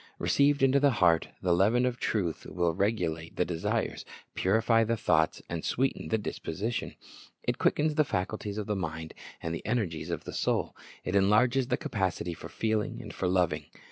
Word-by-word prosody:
Received 140 0 +3
into 135 +1 +5
the 140 0 +5
heart, 85 -5 +4 0.2
the 90 -2 +3
leaven 110 +8 +3
of 125 -1 -1
truth 90 -8 -1
will 85 -2 0
regulate 85 -5 -1
the - - +1
desires, 80 -1 -2 0.3
purify 115 +4 +3
the 115 +1 0
thoughts, 80 -5 +2
and 85 -1 -4
sweeten 135 +2 0
the 110 - +1
disposition. 105 +2 -4 0.5
It - - -1
quickens 150 +1 +2
the 155 0 +4
faculties 105 -2 -3
of 105 - -2
the 105 - -1
mind 80 -3 -4 0.3
and 80 - -2
the 85 - -5
energies 105 -8 -1
of - - -3
the - - -7
soul. - - 0 0.3
It 90 - -2
enlarges 120 +6 +4
the 125 - +1
capacity 95 -3 -2
for - - -9
feeling, 110 -2 -2
for 95 - -2
loving. 85 -5 +1
100 Hz, 170 wpm, -29 LUFS, 85-115 Hz, 0.5 s, into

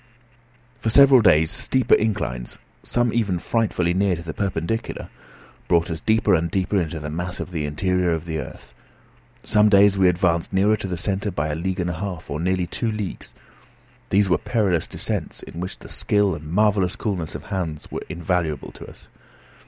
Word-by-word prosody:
For 110 - -1
several 135 +1 +7
days 80 -6 +4
steeper 130 -1 +1
inclines, 65 - 0 0.2
some 120 -2 0
even 105 -6 +1
frightfully 90 -3 0
near 95 0 +2
to 85 - -8
the 80 -2 -6
perpendicular, 100 +2 -3 0.6
brought 85 0 +2
us 80 - -4
deeper 110 -2 +2
and 85 -1 +2
deeper 95 +2 0
into 80 -1 -4
the 75 0 -6
mass 90 +3 -3
of - - -5
the 80 -4 -2
interior 90 +4 0
of 80 0 -2
the 80 -2 -3
earth. 70 - -9 0.7
Some 105 0 +4
days 100 -1 +5
we 95 - +5
advanced 85 0 0
nearer 100 +3 +3
to 105 -2 -6
the 90 -2 -3
centre 100 +4 -1
by 75 -4 -2
a 75 - -2
league 95 +3 -3
and 90 0 -1
a - - -3
half, 95 -4 -5
or 75 - -2
nearly 90 +1 0
two 115 +5 -2
leagues. 105 -3 -6 0.7
These 100 +1 +3
were 85 -4 +2
perilous 100 -9 0
descents, - - -4
in 85 - -9
which 90 +2 -5
the - - -13
skill 105 -2 +1
and 75 -1 -7
marvellous 100 -1 +2
coolness 90 -7 -3
of - - -6
Hans 80 -5 -4
were - - -4
invaluable 85 -2 -2
to - - -11
us. - - -16
90 Hz, 185 wpm, -22 LUFS, 85-105 Hz, 0.7 s, several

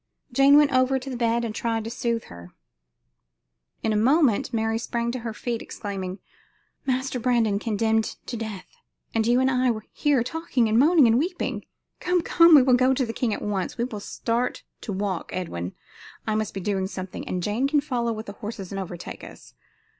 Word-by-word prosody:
Jane 275 +3 +6
went 295 -1 +4
over 255 +1 +3
to 265 +1 -6
the - - -4
bed 235 0 +1
and 220 - -4
tried 225 0 -1
to 225 - -5
soothe 235 -1 -1
her. 85 0 -13 1.3
In 220 - +1
a - - 0
moment 255 +1 +3
Mary 225 0 0
sprang 235 0 -2
to 255 - -4
her 230 -1 -4
feet, 230 +2 -4
exclaiming: 190 -3 -5 0.7
"Master 260 0 -1
Brandon 230 -4 +2
condemned 220 0 0
to 245 - -5
death 220 -4 -5 0.5
and 225 -1 +1
you 240 +1 +4
and 260 0 +3
I 250 -1 +2 0.2
here 285 -5 +2
talking 260 -4 0
and 220 +2 +3
moaning 305 +1 +6
and 230 +1 +4
weeping? 350 +4 -2 0.3
Come, 360 -1 +1
come, 335 -1 +7
we 275 - +8
will 255 -1 +4
go 255 +1 +4
to 260 - +1
the 225 - -5
king 235 -1 -1
at - - -3
once. 195 -3 -2
We 235 - 0
will 230 -4 -4
start 235 +4 -2 0.2
to 215 - -5
walk, 190 -2 -2
Edwin 90 - -4 0.5
I 215 - 0
must 215 -1 -2
be 195 - -3
doing 190 0 -1
something 185 -1 -7
and 180 -1 -2
Jane 220 +8 0
can 295 +1 +3
follow 245 -5 -1
with 220 0 -5
the 200 - -7
horses 205 -2 -7
and 195 - -3
overtake 175 -2 -8
us. - - -12
230 Hz, 200 wpm, -25 LUFS, 210-255 Hz, 1.3 s, we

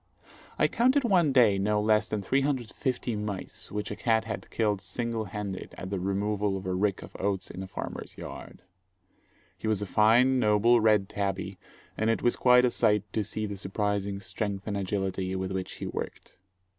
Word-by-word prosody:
I - - +4
counted 260 +4 +3
one 180 - +3
day 115 -7 +5
no 105 +2 +1
less 105 0 +3
than 105 -2 -3
350 130 -1 -1
mice 105 -2 -4
which 105 0 -3
a - - -3
cat 110 0 +2
had 110 - -6
killed 105 -3 0
single 115 +3 -3
handed 100 -1 -6
at 95 +2 -6
the 100 - -1
removal 100 +1 0
of 95 - -8
a 95 - -1
rick 95 +1 0
of - - -12
oats 95 -1 -1
in 90 - -7
a 95 - -6
farmer's - - -6
yard. - - -9 1.0
He - - -4
was 105 -2 +1
a - - -2
fine, 120 +6 +4
noble, 110 +2 +4
red 105 -3 +4
tabby, 95 -1 -3 0.4
and 110 +1 +2
it 115 - 0
was 120 - +3
quite 125 0 +5
a 125 - +2
sight 105 -4 +3
to 110 - 0
see 110 +1 -3
the 100 -1 -5
surprising 100 0 -2
strength 100 0 -4
and 105 - -2
agility 95 -1 -2
with 95 0 -3
which 95 -1 -3
he - - -6
worked. - - -6
105 Hz, 185 wpm, -28 LUFS, 95-115 Hz, 1.0 s, day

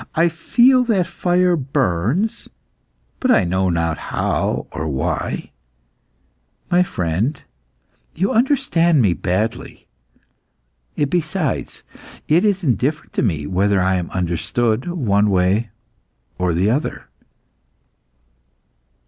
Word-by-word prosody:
I 170 +2 +3
feel 245 +10 +3
that 200 -7 +1
fire 175 +1 +1
burns 135 - -1 0.7
but 260 - 0
I 180 - +5
know 95 +1 0
not 85 -2 -1
how - - -2
or 80 0 -4
why. 65 -4 -3 1.2
My 175 +1 +4
friend, 105 - -1 0.8
you 190 +5 0
understand 175 - +2
me 95 -5 +3
badly. 95 +6 -3 1.1
Besides, 155 +1 -2 0.4
it 165 +4 +3
is 200 -3 +1
indifferent 145 +2 -1
to - - 0
me 80 - -1
whether 95 +4 +1
I 95 +1 +2
am 90 -1 -4
understood 95 - -1
one 105 - +1
way 95 +4 +1 0.7
or 90 -2 0
the 95 +5 +2
other." 145 +6 -3
120 Hz, 105 wpm, -19 LUFS, -, 1.2 s, I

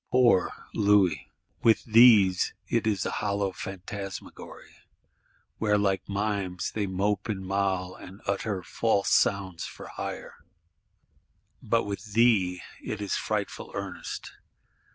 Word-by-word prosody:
Poor 125 -7 +4 0.2
Louis! 100 -7 +3 0.3
With 115 -1 +4
these 110 -5 +6
it 115 -2 0
is 100 -4 0
a - - -1
hollow 100 -1 0
phantasmagory, 95 +1 -8 0.9
where 105 -1 +2
like 100 -2 0
mimes 100 -3 -2
they 105 -2 -2
mope 100 +3 -1
and 95 -3 -3
mowl, 95 -1 -1
and 95 +2 -12
utter 100 -1 -2
false 100 +1 0
sounds 95 -4 +1
for - - -9
hire; - - -6 1.2
but 115 -2 +1
with 100 +1 -6
thee 100 -6 +3 0.2
it 110 - -4
is 100 -2 -2
frightful - - -3
earnest. - - -6
100 Hz, 115 wpm, -27 LUFS, 95-105 Hz, 1.2 s, these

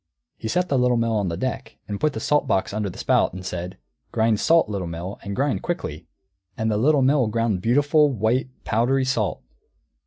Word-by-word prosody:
He 110 - -6
set 180 +10 0
the 135 - +1
Little 125 -1 +3
Mill 115 -1 +1
on 100 -3 0
deck, 115 +6 -4 0.2
put 155 -2 +1
the 110 - -4
salt 150 +6 +1
box 95 - 0
under 105 -1 -2
the - - -10
spout, - - +2
and 95 0 -8
said, 90 0 -5 0.3
"Grind 110 -2 +2
salt, 165 -5 +4
Little 100 -4 -3
Mill, 85 +4 -6
and 100 0 -5
grind 140 +3 0
quickly!" 85 - -4 0.5
And 110 0 0
the 105 - +1
Little 140 +4 +3
Mill 135 -2 +3
ground 110 -3 0
beautiful, 145 - +3
white, 120 +3 0
powdery 130 +5 +1
salt. 115 -6 -1
115 Hz, 190 wpm, -23 LUFS, 100-135 Hz, 0.5 s, salt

